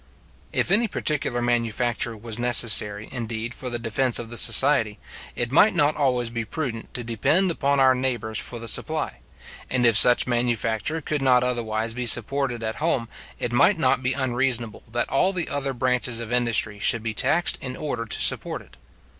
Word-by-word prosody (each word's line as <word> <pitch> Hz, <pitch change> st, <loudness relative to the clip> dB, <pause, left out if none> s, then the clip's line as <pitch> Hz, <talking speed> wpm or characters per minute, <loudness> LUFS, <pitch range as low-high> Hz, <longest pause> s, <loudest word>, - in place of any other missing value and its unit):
If -, -, -1 dB
any 225 Hz, +4 st, +3 dB
particular 140 Hz, -, -2 dB
manufacture 120 Hz, -1 st, -1 dB
was 115 Hz, +1 st, -6 dB
necessary, 110 Hz, -3 st, +3 dB
indeed, 115 Hz, -1 st, -5 dB
for 125 Hz, -, -6 dB
the 120 Hz, -, -3 dB
defence 120 Hz, +2 st, 0 dB
of 115 Hz, -1 st, -4 dB
the -, -, -6 dB
society, 120 Hz, -7 st, +4 dB, 0.4 s
it 120 Hz, 0 st, -3 dB
might 190 Hz, +8 st, +4 dB
not 150 Hz, -3 st, +2 dB
always 125 Hz, -5 st, -1 dB
be 115 Hz, -1 st, -4 dB
prudent 115 Hz, -2 st, -6 dB
to 125 Hz, -, -4 dB
depend 150 Hz, -, +1 dB
upon 140 Hz, -3 st, 0 dB
our 130 Hz, -1 st, +5 dB
neighbours 120 Hz, -4 st, -2 dB
for 120 Hz, -, -5 dB
the 115 Hz, 0 st, -8 dB
supply; -, -, -1 dB, 0.5 s
and 125 Hz, -1 st, 0 dB
if 115 Hz, -2 st, +4 dB
such 120 Hz, +3 st, +6 dB
manufacture 120 Hz, +4 st, -2 dB
could 150 Hz, 0 st, -3 dB
not 125 Hz, -2 st, +3 dB
otherwise 115 Hz, -2 st, -2 dB
be 125 Hz, 0 st, -3 dB
supported 120 Hz, +1 st, +2 dB
at 110 Hz, 0 st, -4 dB
home, 135 Hz, -7 st, -2 dB, 0.3 s
it 120 Hz, -, -4 dB
might 165 Hz, +10 st, +3 dB
not 130 Hz, -4 st, +1 dB
be 125 Hz, 0 st, 0 dB
unreasonable 125 Hz, -4 st, -2 dB
that 120 Hz, +1 st, -1 dB
all 185 Hz, +8 st, +2 dB
the 175 Hz, -3 st, -2 dB
other 140 Hz, -1 st, -2 dB
branches 125 Hz, -2 st, -1 dB
of 115 Hz, 0 st, -7 dB
industry 115 Hz, -4 st, 0 dB
should 115 Hz, +2 st, +2 dB
be 115 Hz, -1 st, -3 dB
taxed 175 Hz, +10 st, +2 dB
in 130 Hz, -1 st, -6 dB
order 125 Hz, -6 st, -4 dB
to 110 Hz, -, -4 dB
support -, -, +2 dB
it. -, -, -22 dB
120 Hz, 180 wpm, -23 LUFS, 115-135 Hz, 0.5 s, such